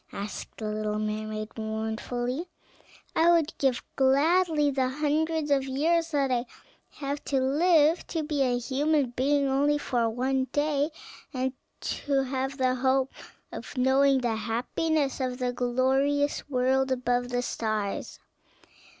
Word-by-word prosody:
asked 205 +1 -6
the 215 - -4
little 210 0 -2
mermaid 215 0 -3
mournfully; 225 +6 -3 0.7
"I 330 +1 +5
would 335 -2 +3
give 265 -3 +1
gladly 300 +3 +3
all - - -1
the 260 -2 0
hundreds 305 +2 0
of 270 -1 +3
years 325 +5 +1
that 280 -4 +1
I 245 0 0 0.5
have 285 0 -4
to 275 - +1
live, 310 +4 +3
to 325 -2 -2
be 295 -2 -1
a 250 -2 +2
human 275 +2 +1
being 275 +3 +1
only 285 +2 +2
for 240 -5 0
one 260 +3 0
day, 290 +1 0 0.5
and 260 0 -1 0.3
to 275 -2 0
have 270 +1 -3
the 255 -1 +2
hope 260 +1 +1 0.4
of - - -8
knowing 265 +1 +4
the 235 -2 0
happiness 270 +7 -1
of 255 -1 -2
that 250 -1 -1
glorious 270 +4 +1
world 265 0 +1
above 245 -1 0
the 245 0 -1
stars." 215 -4 -3
265 Hz, 140 wpm, -27 LUFS, 245-290 Hz, 0.7 s, I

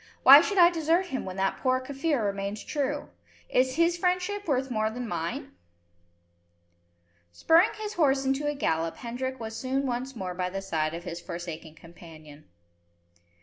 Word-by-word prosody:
Why 275 +3 +11
should 400 +3 -2
I 350 -1 +7
desert 335 +2 +1
him 260 - -2
when 185 -1 -6
that 195 0 -1
poor 255 -1 +1
Kaffir 275 -1 -1
remains 200 +1 -3
true? 290 0 -3 0.4
If 255 0 +2
his 335 +2 +2
friendship 365 +3 -1
worth 265 -3 0
more 215 -2 0
than 245 +2 -5
mine?" 170 -3 -4 1.8
Spurring 330 - +4
his 430 -1 -5
horse 275 -6 +2
into 270 +2 0
a 295 - -1
gallop, 165 - -1
Hendrik 260 +2 -5
was 220 -1 -6
soon 265 +3 -2
once 255 +1 -3
more 185 -4 -4
by 180 0 -2
the 195 +1 -5
side 155 -3 -1
of 170 - -7
his 170 0 -6
forsaken 165 -2 -7
companion. 155 -3 -14
255 Hz, 160 wpm, -27 LUFS, 180-295 Hz, 1.8 s, Why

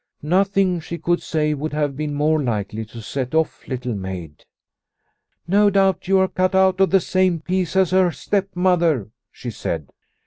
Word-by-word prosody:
Nothing 190 +2 +2
she 170 +1 -6
could 175 +1 0
say 150 -1 0
would 150 +1 -4
have 145 -2 -1
been 150 0 -3
more 155 +1 +2
likely 110 -3 -3
to 115 +1 -11
set 130 +4 -4
off 160 0 -1
Little 125 -2 -3
Maid. 95 -6 -7 0.5
" - - -49
No 205 +3 +4
doubt 195 -2 +1
you 195 0 +4
are 190 0 +3
cut 185 +1 0
out 190 0 +3
of 195 - +4
the 195 - +4
same 185 -1 +1
piece 185 +3 -2
as 190 -2 +3
her 185 -1 +4
stepmother," 180 - 0 0.2
she 120 - -7
said. 80 -8 -4
165 Hz, 175 wpm, -21 LUFS, 130-185 Hz, 0.5 s, No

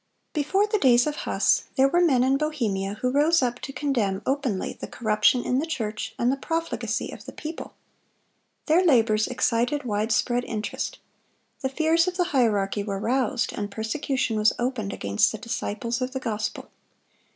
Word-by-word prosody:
Before 330 +7 +2
the 425 0 0
days 245 -5 +5
of 300 -1 -2
Huss, - - +1
there 270 0 +5
were 345 +6 +2
men 270 -8 +4
in 265 +1 +3
Bohemia 225 -10 -1
who 250 - +2
rose 300 +3 +3
up 245 0 -1
to 275 - -6
condemn 245 -8 -1
openly 265 -8 -1
the - - -8
corruption 220 +2 +2
in 250 - +1
the 305 - -1
church 220 -9 -4
and 240 +2 +2
the 275 - -1
profligacy 330 +4 -2
of - - -11
the - - -8
people. 315 +1 -7 0.9
Their 335 +4 +4
labors 225 -9 +3
excited 250 +3 0
widespread 225 +2 0
interest. 215 -2 -4 0.6
The 265 - -2
fears 320 +4 +2
of 365 0 -2
the 360 - +3
hierarchy 210 -6 +2
were 200 -1 -3
roused, 245 +3 0
and 205 -1 -4
persecution 225 +2 -2
was 215 0 +4
opened 240 -5 -2
against 215 +1 +1
the 220 - -5
disciples 235 +1 -3
of 255 +1 -2
the 265 - -2
gospel. 215 -4 -4
250 Hz, 170 wpm, -25 LUFS, 215-285 Hz, 0.9 s, days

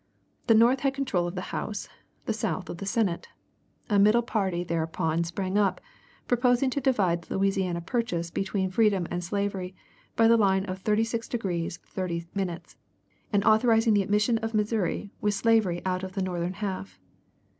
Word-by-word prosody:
The 225 - +6
North 240 +4 +5
had 275 +1 0
control 190 -11 0
of 175 - -6
the 185 - -6
House, 210 -1 -4 0.4
the - - 0
South - - -3
of 170 - -8
the 195 - -5
Senate. 195 -5 0 0.6
A 205 -3 +3
middle 215 +4 +5
party 190 -6 -1
thereupon 165 -1 -1
sprang 185 +4 -1
up, 200 -2 +1 0.5
proposing 245 +1 +2
to 280 - -1
divide 195 -10 +2
the 170 - -5
Louisiana 190 -3 0
purchase 170 -5 -2
between 190 0 -1
freedom 200 -3 +2
and 175 0 -2
slavery 195 -1 -3 0.4
by 225 - +5
the 230 0 +6
line 190 -2 +2
of 185 -1 -5
36 225 +3 0
degrees 175 -7 -2
30', 170 -3 -4 1.1
and 200 -1 +2
authorizing 225 0 +4
the 205 - +4
admission 210 +4 +2
of 225 0 -3
Missouri 210 -2 -1
with 210 0 +1
slavery 210 -6 +2
out 185 0 0
of 190 0 -6
the 195 - -1
northern 180 -1 -2
half. 180 - -5
195 Hz, 165 wpm, -27 LUFS, 180-225 Hz, 1.1 s, The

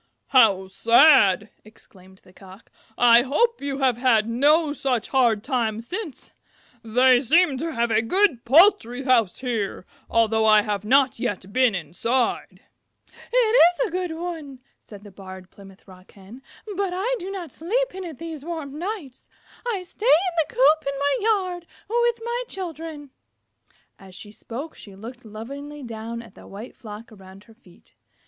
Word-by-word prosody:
"How 215 -7 +4
sad!" 220 -1 +4
exclaimed 190 -3 -19
the 185 - -20
Cock. 190 +2 -16 0.3
"I 235 -1 +6
hope 460 - 0
you 280 -1 -4
have 260 -4 +1
had 235 -4 +2
no 290 +6 +2
such 255 -6 -2
hard 235 -6 +2
time 230 -6 -1
since. 335 - -7 0.5
They 250 +3 +4
seem 305 +3 +3
to 325 +2 -4
have 235 -2 -1
a 220 0 +3
good 310 - +1
poultry 270 - +4
house 240 -8 +1
here, 225 -7 -3 0.2
although 225 -1 +2
I 215 -1 +5
have 205 -2 -3
not 260 +3 +2
yet 200 -5 -4
been 255 -5 +3
inside." 230 - -2 0.7
"It - - 0
is 435 -8 +4
a 460 -7 -1
good 360 -2 -3
one," 320 -6 -7 0.2
said 205 -2 -14
the 205 - -13
Barred 185 -1 -12
Plymouth 195 -1 -17
Rock 185 -1 -17
Hen, 205 +6 -14 0.3
"but 390 -1 -2
I 455 +7 -1
do 365 - -7
not 375 -4 -7
sleep 475 +9 -2
in 380 0 -7
it 330 -6 -8
these 320 -2 -8
warm 310 -3 -6
nights. 350 - -7 0.4
I 390 -5 -4
stay 415 +5 -6
in 340 -3 +3
a - - -14
coop 300 +5 +4
in 280 - -1
my 280 -1 0
yard 370 -5 -1 0.2
with 475 +1 0
my 480 +1 -2
children." 325 - -8 0.9
As 190 -2 -14
she 205 - -11
spoke 255 +8 -8
she 200 -2 -14
looked 235 +5 -11
lovingly 280 +7 -9
down 230 0 -7
at 225 - -17
the - - -15
white 210 +5 -10
flock 215 +1 -11
around 195 -1 -15
her 225 - -19
feet. 205 -7 -23
255 Hz, 165 wpm, -23 LUFS, 220-330 Hz, 0.9 s, I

